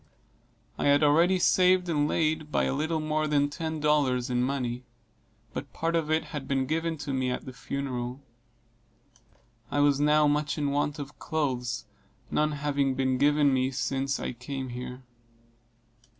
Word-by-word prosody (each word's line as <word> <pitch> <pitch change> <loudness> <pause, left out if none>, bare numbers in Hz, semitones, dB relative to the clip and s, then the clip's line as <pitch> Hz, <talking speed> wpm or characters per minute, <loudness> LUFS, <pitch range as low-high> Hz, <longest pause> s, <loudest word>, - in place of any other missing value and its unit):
I - - +1
had 145 +1 +5
already 165 +6 +4
saved 180 0 +4
and 150 -3 +1
laid 155 -1 0
by - - +2
a - - 0
little 155 +3 -1
more 155 0 0
than 145 -1 +2
ten 160 0 -4
dollars 140 -4 +2
in 125 0 +1
money, 125 -2 -2 0.7
but - - -6
part 165 +1 -1
of 160 -2 0
it 155 0 +2
had 145 -3 -5
been 135 -1 +1
given 160 +3 -1
to 140 - -3
me 130 -1 0
at 125 - -3
the 130 - -8
funeral. 125 -2 -4 1.5
I 145 - -1
was 145 -1 +3
now 150 +1 +4
much 150 +1 +1
in 145 -2 0
want 145 0 0
of 140 -1 -8
clothes, 125 -7 -2 0.5
none 150 0 +1
having 140 -2 0
been 130 -1 0
given 145 -1 +4
me 130 0 +2
since 135 0 -1
I - - -3
came 130 +2 -6
here. 125 +1 -7
145 Hz, 165 wpm, -28 LUFS, 130-155 Hz, 1.5 s, had